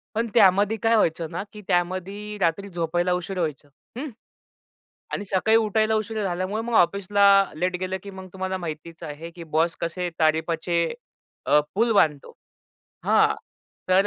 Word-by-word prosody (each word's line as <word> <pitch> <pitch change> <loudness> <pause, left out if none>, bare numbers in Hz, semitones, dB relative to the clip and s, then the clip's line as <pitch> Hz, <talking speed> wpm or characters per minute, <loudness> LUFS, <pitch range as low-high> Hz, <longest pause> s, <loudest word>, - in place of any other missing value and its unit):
पण 230 +1 0
त्यामध्ये 205 0 +5
काय 225 0 +4
व्हायचं 165 -5 +1
ना - - -3
की 210 - -10
त्यामध्ये 185 +4 -2
रात्री 185 +4 0
झोपायला 175 +1 -1
उशीर 180 +2 -3
व्हायचं, 150 -3 -3 0.3
हं. 290 +2 -4 1.0
आणि 205 - -3
सकाळी 210 +4 +3
उठायला 220 0 +2
उशीर 215 0 -2
झाल्यामुळे 185 +4 -2
मग 235 0 -4
ऑफिसला 200 +2 +2 0.3
लेट 180 +3 -1
गेलं 185 0 -2
की 200 - -8
मग 190 0 -9
तुम्हाला 190 0 -3
माहितीच 165 -1 -7
आहे 155 +3 -7
की 170 - -8
बॉस 160 +1 0
कसे 175 +1 -2
तारीफाचे 165 +2 +1 0.6
अ, 150 - +5 0.2
पूल 230 +2 +2
बांधतो. 150 -7 +2 0.7
हां - - +4 0.5
तर 190 +2 +5
185 Hz, 150 wpm, -24 LUFS, 170-205 Hz, 1.0 s, त्यामध्ये